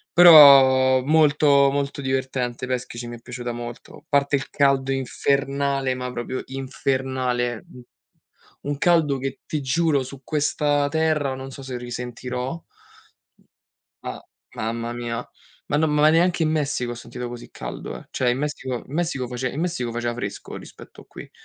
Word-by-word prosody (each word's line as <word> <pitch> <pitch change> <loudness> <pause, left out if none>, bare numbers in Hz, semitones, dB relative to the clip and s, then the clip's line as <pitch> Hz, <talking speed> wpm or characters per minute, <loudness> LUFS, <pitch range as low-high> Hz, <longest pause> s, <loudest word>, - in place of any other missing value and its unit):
Però, 135 -6 +8
molto, 145 -1 +4
molto 140 0 -2
divertente. 130 -2 -2
Peschici 125 -1 -4
mi 120 - -7
è - - -15
piaciuta 120 0 -6
molto, 120 +4 -9
parte 140 0 +2
il 135 - -5
caldo 135 -1 +2
infernale, 140 0 0
ma 125 0 -5
proprio 125 +2 -4
infernale. 130 -2 -2
U 125 - -12 0.9
un 145 - -2
caldo 160 -3 +3
che, 135 +1 -5
ti 155 - -2
giuro, 145 +1 +1
su 135 +1 -10
questa 145 0 0
Terra, 155 -3 0
non 130 0 -7
so 135 +1 -10
se 130 -2 -5
risentirò. 125 +4 -5 1.4
Ma, - - -6 0.3
mamma 115 +1 -3
mia. 120 0 -4 0.4
Ma 150 - 0
no 160 - +3
ma 150 -1 +1
ma 155 - +7
neanche 175 +1 +2
in 155 - +2
Messico 145 -5 -1
ho - - -5
sentito 120 +1 -7
così 120 0 -9
caldo, - - -7
eh. - - -13
Cioè, 125 -1 +1
in 125 - -1
Messico 135 -4 -3
in - - -13
Messico 155 -5 -1
face 125 +1 -3
in 140 +5 -5
Messico 170 -9 -2
faceva 120 0 -2
fresco 100 -4 -6
rispetto - - -13
a - - -22
qui. - - -11
135 Hz, 160 wpm, -23 LUFS, 125-145 Hz, 1.4 s, Però